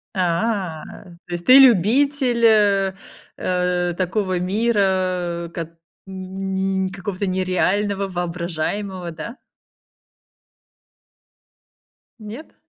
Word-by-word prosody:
А, 180 -1 -1 0.4
то 175 - -8
есть 175 0 -5
ты 255 +1 +8
любитель 250 - +4
э, 200 -3 +4 0.4
э, 180 -1 0
такого 185 0 -1
мира, 185 -4 0
кот 165 -1 -4 0.4
ни 190 0 -3
какого-то 195 0 -4
нереального, 190 +2 0
воображаемого, 175 +1 -3
да? 165 - -8 2.8
Нет? 220 +9 -10
190 Hz, 75 wpm, -21 LUFS, 180-205 Hz, 2.8 s, ты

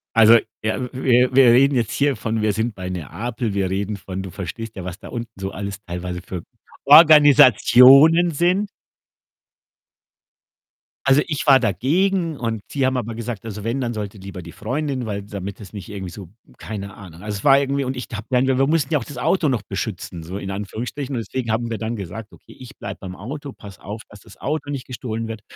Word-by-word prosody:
Also, 115 +1 +8 0.2
ja 110 - -1
w 125 -1 -4
wir 125 -1 +2
wir 135 0 +7
reden 135 +3 +4
jetzt 115 -3 0
hier 140 -2 +1
von 110 0 -2
wir 105 0 +2
sind 110 +1 -2
bei 95 -1 -6
Neapel, 110 - -4
wir 95 -2 0
reden 100 +2 -2
von 95 -1 -6
du 95 - -7
verstehst 110 +5 -7
ja, 95 - -6
was 90 +1 -7
da - - -11
unten 115 -4 -7
so 95 0 -4
alles 100 0 -6
teilweise 90 +1 -5
für 90 -2 -7 0.4
Organisationen 145 - +7
sind. 180 +6 +1 2.4
Also, 135 +2 +5
ich 150 -1 -3
war 135 -2 +7
dagegen 165 - 0
und 115 -3 -3
sie 140 -2 0
haben 130 0 +1
aber 115 -2 -4
gesagt 115 -3 -5
also, 105 -2 -6
wenn, 115 +5 -2
dann 120 -2 -2
sollte 105 -1 -6
lieber 95 -1 -9
die 85 - -10
Freundin, 135 +1 -3
weil 100 -1 -4
damit 100 -1 -7
es 100 -2 -12
nicht 100 -4 -8
irgendwie 95 -3 -6
so 95 -2 -10 0.3
keine 100 -3 -7
Ahnung. 90 -3 -12
Also, 105 -1 -4
es - - -12
war 135 -1 +6
irgendwie 140 0 -1
und 130 0 -3
ich 125 - -5
habe 105 -1 -6
dann 125 0 +2
wir 130 -1 +1
wir 135 - +3
mussten 155 -1 +1
ja 150 - +3
auch - - -7
das 145 - -10
Auto 180 -6 +1
noch 120 -6 -1
beschützen, 95 -3 -5
so 90 +4 -7
in 100 -1 -5
Anführungsstrichen 120 +7 -5
und - - -1
deswegen 125 +3 -4
haben 115 +1 -1
wir 115 - -3
dann 115 +1 -3
gesagt: 100 +2 -7
„Okay, - - -17
ich 130 +1 -12
bleibe - - -7
beim 95 -2 -8
Auto, 140 +8 -7
passe 100 -6 -13
auf, 105 +3 -7
dass 105 - -14
das 105 0 -17
Auto 145 0 -3
nicht 140 -3 -4
gestohlen 115 -3 -5
wird.“ 110 -1 -7
115 Hz, 215 wpm, -21 LUFS, 100-135 Hz, 2.4 s, Also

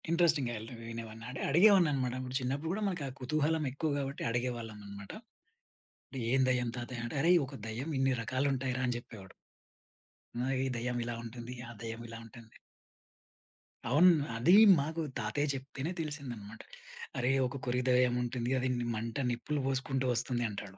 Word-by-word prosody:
ఇంట్రెస్టింగ్‌గా 160 -7 +3
యల్త 110 +3 -8 0.2
వినేవాడిన 115 -1 -7 0.2
అడిగేవాడిననమాట. 155 - +5
ఆ - - -7
చిన్నప్పుడు 135 +5 -2
గూడా 205 +4 -2
మనకా 175 -7 -2
కుతూహలం 155 +4 +1
ఎక్కువ 150 +3 -1
గాబట్టి 140 0 -3
అడిగేవాళ్ళమనమాట. 110 -5 -4 1.0
అంటే 135 - -7
ఏం 135 +1 +4
దెయ్యం 125 -2 +1
తాతయ్య 120 0 -5
అంటే 120 - -5
"అరేయ్! 175 +3 +6
ఒక 135 +1 -9
దెయ్యం 115 +7 -4
ఇన్ని 135 0 +3
రకాలుంటాయిరా" 130 +1 0
అని 125 -1 0
జెప్పేవాడు. 105 -5 -10 1.1
నా 125 - 0 0.2
ఈ - - 0
దెయ్యం 120 +1 -2
ఇలా 120 -1 -3
ఉంటుంది. 120 +1 -7
ఆ - - -8
దెయ్యం 115 0 -5
ఇలా 115 0 -8
ఉంటుంది. 115 0 -14 1.3
అవును. 160 +9 +7 0.3
అదీ 165 +11 +6 0.2
మాకు 160 +4 -2 0.2
తాతయ్య 115 +7 0
చెప్తేనే 135 +3 -4
తెలిసిందనమాట. 125 -9 -6 0.6
"అరేయ్! 130 +2 +2
ఒక 125 +1 -7
కొరివి 125 +1 0
దెయ్యం 125 -1 +4
ఉంటుంది 120 0 -2
అది 130 +1 0
ని 120 - -2
మంట 115 +5 -2
నిప్పులు 145 +5 -2
బోసుకుంటూ 135 0 0
వస్తుంది" 120 +1 0
అంటాడు. 100 -1 -8
125 Hz, 145 wpm, -32 LUFS, 115-140 Hz, 1.3 s, అవును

